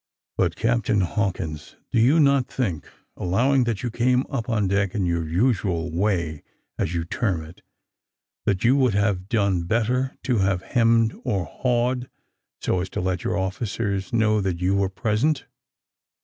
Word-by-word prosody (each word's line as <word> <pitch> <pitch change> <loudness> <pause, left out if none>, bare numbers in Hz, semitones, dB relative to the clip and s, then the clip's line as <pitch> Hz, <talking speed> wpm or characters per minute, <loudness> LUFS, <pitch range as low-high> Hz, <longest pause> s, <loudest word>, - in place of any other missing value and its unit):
"But, - - +1
Captain 115 -3 +1
Hawkins, 85 -5 -2 0.2
do - - +2
you 135 +8 +5
not 140 -3 +4
think, 95 - -3 0.3
allowing 125 +9 +2
that 115 -2 -2
you 120 - -2
came 125 +3 +2
up 125 -3 -3
on 105 -4 +1
deck 100 0 0
in 100 -3 0
your 85 -2 -1
usual 90 -4 +1
way, 85 -4 -1 0.4
as 85 - -1
you 85 -1 -1
term 90 -4 -1
it, 80 +3 -14 0.9
that 100 -3 +1
you 120 +3 +5
would 130 -7 +2
have 100 -2 0
done 100 -6 +1
better, 120 +6 0
to 125 -4 +1
have 95 -1 +1
hemmed 115 -1 +3
or 95 -4 -1
hawed, 125 - -1 0.5
so 90 - 0
as 95 - -4
to - - -4
let 90 0 -1
your - - -1
officers 100 0 -2
know 110 -2 +2
that 95 -3 -2
you 90 +2 +1
were 100 -1 +1
present? 110 +10 0
105 Hz, 165 wpm, -24 LUFS, 90-120 Hz, 0.9 s, you